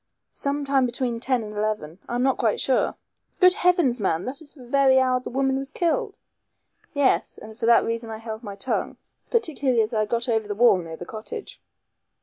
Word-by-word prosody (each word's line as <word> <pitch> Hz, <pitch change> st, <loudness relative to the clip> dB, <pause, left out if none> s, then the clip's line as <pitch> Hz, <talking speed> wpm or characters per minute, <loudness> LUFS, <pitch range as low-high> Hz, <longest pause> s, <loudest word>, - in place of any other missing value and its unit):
"Some 285 Hz, +1 st, -2 dB
time 270 Hz, -2 st, +2 dB
between 240 Hz, -1 st, -2 dB
ten 250 Hz, -1 st, 0 dB
and 210 Hz, 0 st, -8 dB
eleven. 210 Hz, -6 st, -3 dB
I'm 245 Hz, +1 st, 0 dB
not 265 Hz, 0 st, +1 dB
quite 225 Hz, -4 st, +1 dB
sure." 265 Hz, -, +1 dB, 0.4 s
"Good 365 Hz, -2 st, +7 dB
heavens! 350 Hz, -, +2 dB
man, 180 Hz, -4 st, 0 dB
that 270 Hz, +5 st, -5 dB
is 295 Hz, -1 st, -14 dB
the 255 Hz, -4 st, -13 dB
very 265 Hz, +1 st, +4 dB
hour 255 Hz, -1 st, +2 dB
the 250 Hz, -, -7 dB
woman 270 Hz, +1 st, 0 dB
was 270 Hz, 0 st, -5 dB
killed!" 335 Hz, +1 st, -1 dB, 0.8 s
"Yes. 285 Hz, -2 st, +1 dB
And 215 Hz, 0 st, -11 dB
for 230 Hz, 0 st, -2 dB
that 235 Hz, -, +5 dB
reason 230 Hz, 0 st, -3 dB
I 220 Hz, -, -5 dB
held 220 Hz, 0 st, -7 dB
my 205 Hz, -4 st, -7 dB
tongue; 225 Hz, +6 st, -2 dB, 0.3 s
particularly 285 Hz, -, +1 dB
as 215 Hz, +3 st, -5 dB
I 215 Hz, -1 st, +1 dB
got 235 Hz, +2 st, -1 dB
over 220 Hz, -3 st, 0 dB
the 205 Hz, -, -3 dB
wall 235 Hz, -2 st, +5 dB
near 165 Hz, -2 st, -7 dB
the 175 Hz, -, -8 dB
cottage." 225 Hz, -, -8 dB
245 Hz, 200 wpm, -24 LUFS, 220-275 Hz, 0.8 s, Good